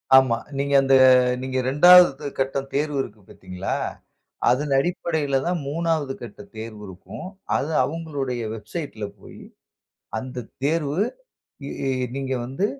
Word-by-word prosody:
ஆமா. 130 -3 +6 0.2
நீங்க 140 0 -1
அந்த 135 0 +4 0.5
நீங்க 130 0 -5
2வது 150 +2 +7
கட்டம் 135 +1 -1
தேர்வு 145 0 0
இருக்கு 110 -5 -9
பாத்தீங்களா? 95 +1 -4 0.7
அதன் 140 +4 +1
அடிப்படையில 160 -3 -1
தான், 175 0 0
3வது 155 -2 -1
கட்ட 120 - -10 0.2
தேர்வு 110 -1 -7
இருக்கும். 95 - -9 0.3
அது 150 +4 -2
அவுங்களுடைய 140 -4 -3
வெப்சைட்ல 110 +1 -6 0.2
போயி, - - -12 0.8
அந்த 125 -1 -7 0.2
தேர்வு 150 +1 0 0.7
இ, - - -5 0.5
நீங்க 135 -1 -2
வந்து, 135 +11 -1
135 Hz, 115 wpm, -23 LUFS, 125-155 Hz, 0.8 s, 2வது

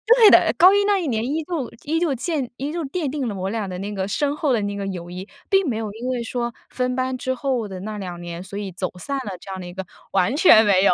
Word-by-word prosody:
对 450 -4 +8
的， - - +6
高 370 +3 +8
一 405 0 +3
那 410 -1 +3
一 345 - -2
年 220 -4 0
依 305 +5 -1
旧 305 -7 -3
依 325 +3 0
旧 315 -6 +1
鉴 275 -1 -2
依 280 +3 -3
旧 335 -1 -3
奠 290 +1 -2
定 275 -3 -2
了 205 - -3
我 190 0 -3
俩 215 -2 -2
的 180 -1 -5
那 205 +1 -4
个 190 -1 -2
深 285 +8 0
厚 285 -5 +1
的 220 - +1
那 205 0 -2
个 200 -1 -3
友 175 -2 -5
谊， 185 +3 -7 0.2
并 390 -4 +3
没 235 - -1
有 220 -2 -3
因 235 +3 -6
为 245 -2 -1
说 235 0 -3 0.2
分 250 0 -1
班 255 0 -1
之 260 +1 -2
后 250 -4 -1
的 185 -2 -7
那 215 +1 -5
2 180 -3 -6
年， 170 0 -6
所 195 +1 -8
以 200 -2 -4
走 180 +1 -3
散 275 +10 -3
了 210 -8 -4
这 195 - -9
样 190 - -5
的 175 - -7
一 175 - -9
个， 190 0 -5 0.3
完 195 +6 +3
全 225 - +7
没 195 -2 +4
有。 - - +6
235 Hz, 305 characters per minute, -22 LUFS, 195-280 Hz, 0.3 s, 对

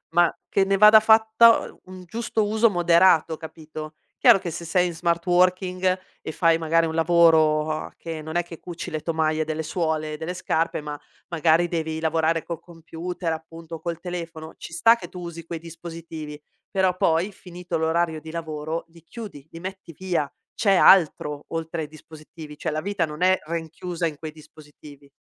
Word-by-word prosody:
ma 175 -1 +4
che 195 - +3
ne 195 0 +1
vada 210 +2 +9
fatta 220 +1 +5
u - - -23
un 185 0 -10
giusto 220 +1 -1
uso 220 +1 +3
moderato, 170 -2 +4
capito? 155 -1 -9 0.2
Chiaro - - +6
che 175 - -5
se 170 +1 -6
sei 180 +2 +2
in 170 - -5
smart 170 0 0
working 185 +1 +2 0.2
e 155 - -4
fai 165 0 +3
magari 165 0 +2
un 160 - -4
lavoro, 160 -2 +4
uhm, 155 0 -4
che 160 -2 -7
non 160 +2 -7
è 175 - +3
che 165 -1 -11
cuci 175 -2 -7
le 155 -1 -4
tomaie 160 -1 0
delle 155 0 -3
suole 155 -2 -2
delle 160 +3 -4
scarpe, 165 -3 -1
ma 150 -1 -6 0.3
magari 165 +1 +2
devi 160 -2 -3
lavorare 160 0 +1
col 170 -2 -6
computer, 170 +1 -6
appunto, 165 +1 -9
o 160 - -9
col 170 -2 -4
telefono, 165 -3 -7
ci 165 - -10
sta 225 +7 +5
che 235 - -9
tu 180 - -10
usi 170 -2 -8
quei 165 -1 -5
dispositivi. 165 -2 -9 0.3
Però 190 -1 +1
poi 170 +3 +1
finito 180 -2 -6
l'orario 160 0 0
di 160 +1 -10
lavoro, 160 0 -4
li 165 -1 -19
chiudi, 180 - -10
li 165 - -9
metti 190 -2 -8
via, 175 -6 -1 0.3
c'è 200 -3 +3
altro 150 -6 +4
oltre 165 0 -4
ai 150 - -6
dispositivi. 155 0 -12
Cioè, 160 - -3
la 155 +1 -2
vita 200 -1 -1
non 150 +2 -9
è 185 +1 +4
rinchiusa 170 +1 -3
in 150 -3 -6
quei 155 0 -7
dispositivi. 150 -2 -16
165 Hz, 185 wpm, -24 LUFS, 160-180 Hz, 0.3 s, vada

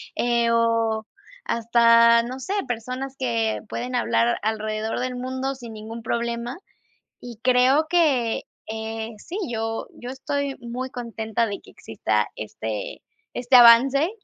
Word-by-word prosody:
Eh, 235 -1 +1
o 230 -1 +1 0.4
hasta, 230 0 +5
no 255 +3 -6
sé, 375 +9 -4
personas 255 +3 -4
que 230 -4 -1
pueden 250 +1 -4
hablar 120 - +2
alrededor 215 0 -2
del 250 0 -2
mundo, 260 +2 -3
sin 240 -3 -10
ningún 220 +2 -8
problema. 235 +3 -2 0.6
Y 240 -3 -10
creo 255 +5 +4
que, 285 -10 +2 0.2
eh, 220 0 -5
sí, 355 - -7
yo 225 -1 -3
yo 245 +1 -8
estoy 280 0 -3
muy 245 +2 -5
contenta, 230 -2 -2
de 200 -2 -5
que - - -17
exista 105 -1 -1
este 110 0 -5 0.3
este 250 +1 +4
avance, 260 +7 +7
235 Hz, 130 wpm, -24 LUFS, 225-255 Hz, 0.6 s, avance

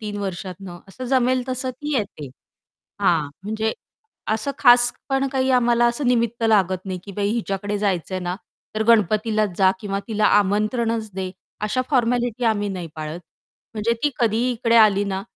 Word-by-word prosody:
3 210 -2 -5
वर्षातनं 185 -1 -6
असं 255 +6 -8
जमेल, 255 0 +2
तसं 255 0 -2
ती 295 +4 -5
येते. 155 - -4 0.7
हां 155 -4 +2 0.2
म्हणजे 220 +1 -1 0.6
असं 220 +6 -1
खास 245 -2 +6 0.2
पण 270 0 +1
काही 265 -1 0
आम्हाला 240 -1 +3
असं 240 +4 -2
निमित्त 235 -1 +1
लागत 190 -4 +2
नाही 185 -1 -4
की 200 - -9
बाई 200 +1 -1
हिच्याकडे 205 -2 -2
जायचंय 190 -2 -1
ना, 180 0 -3 0.4
तर 220 - +1
गणपतीलाच 215 0 +3
जा 190 -1 +5
किंवा 200 -1 -3
तिला 215 -1 +1
आमंत्रणच 215 +3 0
दे. 190 -1 -3 0.3
अशा 215 +5 0
फॉर्मॅलिटी 245 -2 +1
आम्ही 205 -2 +1
नाही 180 -3 -5
पाळत 155 +2 -5 0.6
म्हणजे 215 +2 +1
ती 295 - +3
कधीही 235 +2 +2
इकडे 235 0 +1
आली 205 -3 +5
ना, 195 -1 -3
215 Hz, 160 wpm, -22 LUFS, 195-240 Hz, 0.7 s, खास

